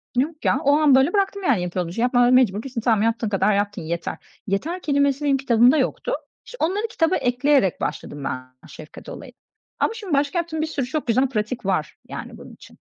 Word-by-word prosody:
Yok 300 +5 -1
ya, 265 - +3
o 285 +1 +4
an 295 -4 +5
böyle 270 +8 +3
bıraktım 395 0 0
yani 240 - +2
yaptığım 180 0 -2
işi. 230 +7 -4
Yapmaya 245 0 +3
mecbur 230 -5 +3
değilsin, 255 -4 -5
tamam 220 -3 +2
yaptığın 230 -1 0
kadar 210 +1 +2
yaptın 205 -1 -1
yeter. 170 +2 -4 0.3
"Yeter" 320 - -2
kelimesi 280 0 +1
benim 275 -1 +3
kitabımda 250 +2 +4
yoktu. - - -1 0.3
İşte, - - -11
onları 400 +7 0
kitaba 345 -4 +1
ekleyerek 250 - +1
başladım 145 -1 -4
ben 130 0 -7
şefkat - - -12
olayına. - - -10 0.5
Ama - - +1
şimdi 410 -8 -6
başka 285 +5 +1
yaptığım 320 -2 -3
bir 315 - -1
sürü 280 -5 -2
çok 280 +1 -4
güzel 255 +3 +2
pratik 215 -1 -3
var 180 -6 -1
yani - - -7
bunun - - -12
için. - - -17
260 Hz, 200 wpm, -22 LUFS, 210-310 Hz, 0.5 s, an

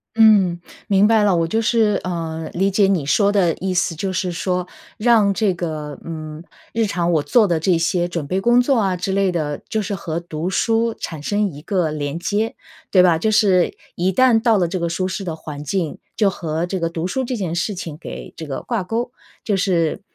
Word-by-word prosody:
嗯， 205 -6 +5 0.3
明 200 +1 +4
白 220 -1 +4
了。 205 -2 +3
我 165 -1 +1
就 220 +6 0
是， 220 -3 +2
呃， 165 -3 -4
理 195 +3 +1
解 200 +1 +3
你 185 -7 +1
说 200 +8 +3
的 180 -5 +2
意 190 0 -1
思， 170 -2 0
就 190 +4 -3
是 185 0 -1
说， 180 +1 -2 0.3
让 215 -3 +4
这 200 -1 +1
个， 155 -4 -5
嗯， 155 -1 -7 0.3
日 225 0 +1
常 175 -4 -1
我 155 -3 +2
做 225 +3 +4
的 170 -3 +1
这 175 +1 +3
些 175 +1 0
准 165 -4 -4
备 190 +5 -1
工 240 +3 +4
作 255 +1 +3
啊 195 -4 +1
之 190 +2 -2
类 195 -1 +2
的， 150 -4 -3
就 220 - 0
是 200 0 -3
和 165 -3 -4
读 170 0 -4
书 225 +4 +1
产 155 -3 -6
生 205 +5 +1
一 150 -6 -8
个 175 -2 0
连 150 +1 -3
接， 210 +5 -1 0.4
对 185 - +6
吧？ 175 -3 +4
就 215 +7 0
是 195 -4 +3 0.2
一 180 +2 +1
旦 235 +2 +4
到 225 -2 +3
了 180 -3 +2
这 180 +2 -3
个 170 0 -1
舒 185 +2 -1
适 190 +2 -4
的 170 -4 -3
环 150 -2 -8
境， 165 +1 -2 0.2
就 205 -3 +4
和 165 -3 -3
这 185 0 -4
个 165 - 0
读 165 +1 -3
书 260 +8 -2
这 250 0 -3
件 180 -5 -3
事 185 +4 -1
情 165 -5 -6
给 170 - -9
这 160 - -7
个 135 -3 -5
挂 230 -6 -2
钩， 230 +6 -3 0.3
就 205 - +1
是， 180 -4 0
185 Hz, 240 characters per minute, -20 LUFS, 165-205 Hz, 0.4 s, 对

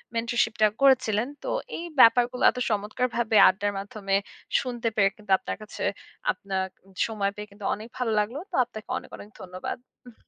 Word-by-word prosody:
Mentorship 230 -1 +1
টা 215 - +8
করেছিলেন। 255 -4 +4 0.2
তো - - -6 0.3
এই 335 - -5
ব্যাপারগুলো 245 +1 +5
এত - - -5
চমৎকারভাবে 220 +2 -1
আড্ডার 205 +2 -1
মাধ্যমে 195 -1 -2 0.5
শুনতে 240 -3 -3
পেয়ে 200 -2 +4
কিন্তু 210 -3 -9
আপনার - - -5
কাছে 215 - -7 0.5
আপনার 190 -1 -3 0.2
উম 195 - -20
সময় 200 -3 -1
পেয়ে 210 0 -7
কিন্তু 200 0 -10
অনেক 215 +2 -7
ভালো 250 -3 0
লাগলো। 225 +7 -1
তো - - -3
আপনাকে 220 -3 -11
অনেক, - - -9
অনেক 205 - -11
ধন্যবাদ। 185 +4 -6 0.3
উহু 235 - -16
215 Hz, 170 wpm, -26 LUFS, 200-240 Hz, 0.5 s, টা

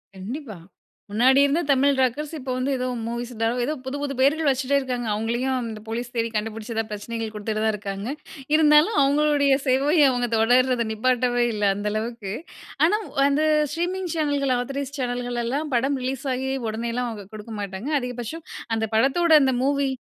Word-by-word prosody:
கண்டிப்பா. 220 - -7 0.5
முன்னாடி 255 +5 +4
இருந்த 290 +5 +1
தமிழ் 275 0 +3
ராக்கர்ஸ் 285 +5 0
இப்போ 260 -2 -5
வந்து 255 +2 -1
ஏதோ, 255 0 -2 0.2
மூவிஸ் 235 +1 -4
தோ, - - +3 0.2
ஏதோ 300 - -1
புது 270 +2 -3
புது 285 -1 -2
பெயர்கள் 285 +3 +3
வச்சுட்டே 270 +1 +1
இருக்காங்க. 250 -3 -3
அவுங்களயும் 235 +5 -1
அந்த 220 -2 -5
போலீஸ் 240 +2 -4
தேடி 230 0 0
கண்டுபிடிச்சதா, 225 +1 -3
பிரச்சனைகள் 225 +1 -4
குடுத்துட்டே 215 0 -3
தான் 220 - +3
இருக்காங்க. 200 0 -5 0.5
இருந்தாலும் 305 +6 +5
அவுங்களுடைய 285 0 +3
சேவை, 275 +5 +3
அவுங்க 245 -1 0
தொடர்றத 245 +1 +3
நிப்பாட்டவே 245 +1 +1
இல்லை 205 -1 +1
அந்த 205 +1 -3
அளவுக்கு. 215 -2 -4 0.5
ஆனா 420 - +3 0.3
அந்த 285 +2 +2 0.3
ஸ்ட்ரீமிங் 360 +1 -2
சேனல்கள், 285 -4 +1
ஆதாரைஸ்ட் 275 +2 -4
சேனல்கள் 245 -1 -2
எல்லாம் 285 +5 -2
படம் 270 +3 +1
ரிலீஸ் 265 +1 -3
ஆகி 265 +1 -2 0.2
உடனே 230 +2 -3
எல்லாம் 250 -1 -1
அவுங்க 205 -3 -8
குடுக்க 215 +1 -8
மாட்டாங்க. 195 +6 -5
அதிகபட்சம் 250 +6 -6 0.3
அந்த 220 0 0
படத்தோட 300 +9 +3
இந்த 260 -2 +2
மூவி 280 0 +1
250 Hz, 160 wpm, -24 LUFS, 225-280 Hz, 0.5 s, இருந்தாலும்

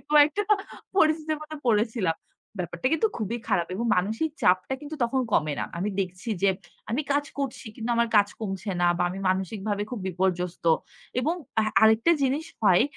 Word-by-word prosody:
কয়েকটা 300 +6 +6 0.5
পরিস্থিতির 310 -2 +3
মধ্যে 305 0 -7
পড়েছিলাম। 210 -6 +2 0.4
ব্যাপারটা 175 +4 -3
কিন্তু 445 - +2
খুবই 230 +2 -2
খারাপ 170 -2 +2
এবং 230 - -2
মানসিক 220 - 0
চাপটা 185 +8 +3
কিন্তু 300 +1 -7
তখন 260 +3 0
কমে 150 -4 +2
না। - - 0
আমি 200 +4 -1
দেখছি 185 +3 -4
যে 200 - +5 0.4
আমি 260 +7 0
কাজ 290 +1 +1
করছি 270 -3 -3
কিন্তু 225 +1 -3
আমার 235 0 +3
কাজ 205 0 +5
কমছে 195 -1 -3
না 175 - +5
বা - - +2
আমি 190 - -6
মানসিকভাবে 200 +2 -1
খুব 245 -5 -4
বিপর্যস্ত 180 -1 -1 0.6
এবং 315 +7 +1 0.3
আ - - +2 0.2
আরেকটা 220 +8 +6
জিনিস 275 +4 +1 0.2
হয়, 190 -4 +6
220 Hz, 165 wpm, -26 LUFS, 185-280 Hz, 0.6 s, কয়েকটা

